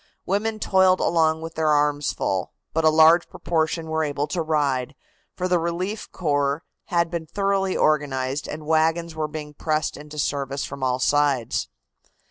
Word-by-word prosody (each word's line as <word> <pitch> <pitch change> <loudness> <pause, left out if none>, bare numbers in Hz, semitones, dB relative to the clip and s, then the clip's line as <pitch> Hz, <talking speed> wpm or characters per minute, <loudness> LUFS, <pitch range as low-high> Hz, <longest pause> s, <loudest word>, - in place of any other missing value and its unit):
Women 215 +3 0
toiled 190 -2 +4
along 160 -1 +2
with 165 0 -6
their 160 -1 0
arms 145 -1 +2
full, 95 -1 -2 0.2
but 160 - +1
a 155 - +6
large 160 +2 +5
proportion 160 0 -1
were 160 0 0
able 145 -1 -1
to 175 - -1
ride, 145 -4 0 0.4
for 185 - -1
the 180 -1 +2
relief 180 +5 -3
corps 145 -2 0 0.2
had 170 -1 0
been 170 -2 -4
thoroughly 195 +1 0
organized 140 -2 0
and 150 0 -7
wagons 160 +1 +1
were 155 -1 -2
being 150 -1 -7
pressed 155 0 -1
into 150 +1 -10
service 140 -1 -2
from 140 0 -8
all 130 -1 +1
sides. 140 -2 +1
155 Hz, 160 wpm, -23 LUFS, 145-170 Hz, 0.4 s, a